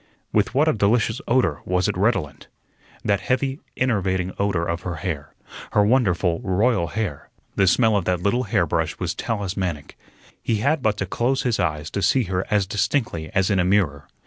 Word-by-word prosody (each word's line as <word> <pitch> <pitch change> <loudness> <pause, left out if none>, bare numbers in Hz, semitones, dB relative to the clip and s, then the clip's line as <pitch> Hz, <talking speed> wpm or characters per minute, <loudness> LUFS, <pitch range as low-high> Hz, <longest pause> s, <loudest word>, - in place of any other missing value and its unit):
With 105 +4 +1
what 150 +4 +4
a 155 - +4
delicious 110 +3 +1
odor 120 - +2
was 90 +2 0
it 105 - -1
redolent! 90 - -1 0.6
That 100 -1 +2
heavy, 130 +6 -1 0.2
enervating 95 -7 0
odor 100 -4 0
of 85 0 -2
her 90 -1 -4
hair 80 -5 -5 0.4
her 105 - +4
wonderful, 95 -8 +2
royal 95 -1 +1
hair! 100 -8 -4 0.3
The 95 - +3
smell 110 +3 +4
of 100 -4 0
that 90 -1 +1
little 120 +6 +1
hairbrush 100 - 0
was - - -2
talismanic. 95 -8 -3 0.4
He 115 - 0
had 140 +8 +1
but 110 -3 +1
to 100 - -2
close 120 +8 0
his 120 -5 0
eyes 75 -4 -1
to 100 - -2
see 130 +5 +3
her 95 -1 -2
as 105 -2 +2
distinctly 100 - -1
as 95 +1 +2
in 95 - +2
a - - +3
mirror. 90 -7 +1
100 Hz, 180 wpm, -23 LUFS, 90-115 Hz, 0.6 s, what